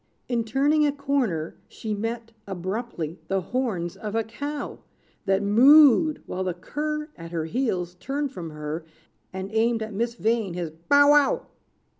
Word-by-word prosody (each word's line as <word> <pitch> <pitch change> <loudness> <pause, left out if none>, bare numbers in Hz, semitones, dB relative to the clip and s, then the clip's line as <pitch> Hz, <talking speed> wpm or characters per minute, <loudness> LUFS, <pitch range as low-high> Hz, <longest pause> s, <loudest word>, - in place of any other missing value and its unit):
In 235 -2 0
turning 280 +7 +2
a - - +2
corner, 270 - -1
she 215 -1 -5
met 225 +2 -4 0.2
Abruptly, 185 -3 -4
the 195 0 +1
horns 190 -6 -2
of 210 0 -5
a 225 - +2
cow 285 +6 -5 0.5
That 195 +1 +2
mooed, 285 +8 +6
while 185 - -3
the 180 -2 -2
cur, 300 - -4
At 165 -1 -9
her 165 -2 -2
heels, 180 -4 -1
turned 280 +3 -2
from 175 -10 -6
her, 150 +1 -5 0.5
And 190 +1 -6
aimed 225 0 +2
at 220 -1 -7
Miss 235 +3 -1
Vain 220 -6 0
his 170 -3 -3
"bow 285 - +4
wow." 290 -2 +4
225 Hz, 155 wpm, -25 LUFS, 180-275 Hz, 0.5 s, mooed